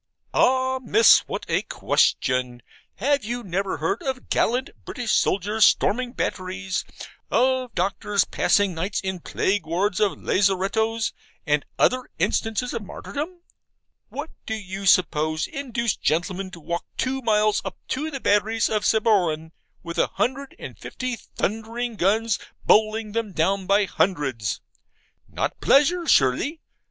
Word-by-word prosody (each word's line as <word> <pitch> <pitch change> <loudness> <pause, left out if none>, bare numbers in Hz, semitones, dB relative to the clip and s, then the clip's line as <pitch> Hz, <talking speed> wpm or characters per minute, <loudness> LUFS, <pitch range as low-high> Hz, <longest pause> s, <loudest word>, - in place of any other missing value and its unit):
Ah, 260 0 +2
Miss, 225 -2 +6
what - - -4
a - - +1
question! 125 -2 0 0.3
Have 280 +4 +1
you 240 +3 -4
never 195 0 -2
heard 165 +8 -1
of 265 -2 -4
gallant 250 +4 +1
British 245 -4 -3
soldiers 205 +3 +2
storming 245 +3 +3
batteries, 185 -3 -3 0.5
of 255 -1 +2
doctors 200 +2 +1
passing 205 -2 +2
nights 185 +5 -2
in 190 -1 -3
plague 195 +3 -1
wards 180 +4 0
of 210 -2 +2
lazarettos, 205 +4 +1 0.3
and 150 -2 +1
other 255 0 +2
instances 225 +2 0
of 230 - -3
martyrdom? 310 - -6 0.7
What 290 +4 -6 0.2
do 220 - -1
you 195 -1 -5
suppose 155 -3 +3
induced 235 -5 -3
gentlemen 180 +4 -1
to 180 - -11
walk 170 +2 -3
two 265 +1 -1
miles 215 -2 +2
up 195 - -6
to 300 +4 -2
the 275 -3 -5
batteries 215 0 +2
of 215 -1 0
Sabroan, 180 -8 +2 0.3
with 170 0 -5
a - - +3
hundred 270 +2 -2
and - - -9
fifty 255 -1 -4
thundering 225 +2 -4
guns 215 +3 +1 0.3
bowling 215 0 +3
them 220 -2 -3
down 185 +4 0
by 200 +1 +4
hundreds? 135 - -1 0.7
not - - -3
pleasure, 335 +5 +4
surely. 195 - +3
210 Hz, 135 wpm, -24 LUFS, 185-245 Hz, 0.7 s, Miss